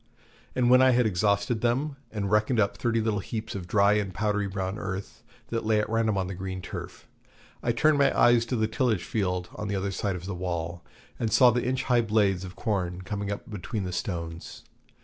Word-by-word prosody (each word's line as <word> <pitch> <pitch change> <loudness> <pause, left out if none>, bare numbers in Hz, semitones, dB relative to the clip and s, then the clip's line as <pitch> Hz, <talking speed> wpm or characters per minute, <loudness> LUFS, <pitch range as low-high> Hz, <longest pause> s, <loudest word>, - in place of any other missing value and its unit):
And 125 -1 +3
when 130 0 +7
I 130 -1 +6
had 125 0 +3
exhausted 105 +3 +1
them, 135 +5 0 0.2
and 100 -2 -3
reckoned 105 +3 +2
up 100 -2 +2
thirty 115 -1 0
little 110 -2 0
heaps 110 +2 -5
of 90 -3 -6
dry 100 +1 +4
and 105 -2 0
powdery 105 +1 0
brown 95 +1 -3
earth, 95 -1 -5 0.3
that 115 -1 -2
lay 110 -1 +2
at 105 - 0
random 110 -2 +1
on 95 - 0
the 95 - -5
green 95 0 -5
turf, 90 - -8 0.5
I 120 - +1
turned 150 +5 +3
my 140 - +3
eyes 120 -1 +6
to 125 - -1
the 110 -2 +1
tillage 110 -4 0
field 90 -4 -2
on 110 - -5
the 100 - -1
other 100 +1 -1
side 100 0 -2
of 90 0 -7
the 100 - -4
wall, 85 -1 -4 0.4
and 115 -2 -1
saw 125 -2 +7
the 120 0 -1
inch 130 +1 0
high 125 -2 +3
blades 105 -4 +1
of 95 +1 -8
corn 95 -5 -2
coming 100 0 -3
up 100 - -5
between 105 0 -4
the 90 -1 -4
stones. 85 -3 -5
105 Hz, 215 wpm, -27 LUFS, 95-115 Hz, 0.5 s, when